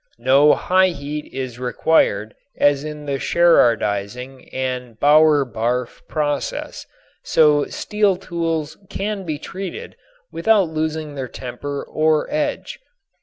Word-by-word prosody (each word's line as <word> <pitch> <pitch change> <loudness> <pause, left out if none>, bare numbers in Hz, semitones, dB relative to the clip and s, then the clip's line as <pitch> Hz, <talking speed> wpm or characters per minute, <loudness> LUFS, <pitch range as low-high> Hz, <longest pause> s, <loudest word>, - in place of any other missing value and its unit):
No 135 +5 +5
high 185 +1 +3
heat 150 -3 -5
is 130 -2 -5
required 125 -5 +1 0.2
as 145 -1 +3
in 150 -1 -7
the 140 -1 -2
Sherardizing 125 -6 +1
and 125 -3 -4
Bower 150 -1 +5
Barff 120 +1 -3
processes, 145 -2 -3 0.3
so 150 -2 +3
steel 210 -2 0
tools 165 -4 -3
can 200 -1 -4
be 155 -3 -3
treated 195 - -7 0.4
without 195 0 +2
losing 155 -1 -3
their 135 -2 -5
temper 140 +3 -6
or 155 -1 +1
edge. 300 - -2
150 Hz, 115 wpm, -20 LUFS, 130-165 Hz, 0.4 s, No